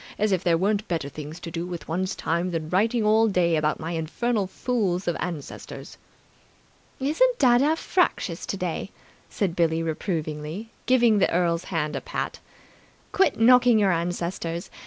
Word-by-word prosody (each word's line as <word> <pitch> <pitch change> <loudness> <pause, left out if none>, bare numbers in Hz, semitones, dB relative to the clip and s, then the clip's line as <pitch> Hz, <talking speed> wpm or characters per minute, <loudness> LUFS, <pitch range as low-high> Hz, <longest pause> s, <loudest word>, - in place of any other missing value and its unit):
As 210 0 +1
if 190 -1 +1
there 170 -2 +3
weren't 205 +3 0
better 160 -5 -2
things 150 +3 -8
to 165 - -7
do 170 0 -3
with 175 -2 -7
one's 185 +3 -2
time 170 +2 -1
than 160 -3 -3
writing 220 +6 +2
all 220 +1 +4
day 180 -5 +2
about 155 -1 0
my 160 +1 -4
infernal 195 +6 -1
fools 195 -5 -1
of 175 - +1
ancestors!" 165 -5 -6 1.0
"Isn't 330 - +2
dadda 270 +4 +4
fractious 325 - 0
today?" 185 -1 -3 0.4
said 185 -5 -2
Billie 165 -1 +1
reprovingly, 160 +3 -4 0.2
giving 240 -4 +4
the - - +2
Earl's 170 -1 +1
hand 155 -4 -2
a - - -3
pat. - - -4 0.7
"Quit 385 - +2
knocking 245 0 +6
your 200 -3 +3
ancestors! 170 0 -3
180 Hz, 155 wpm, -25 LUFS, 165-220 Hz, 1.0 s, knocking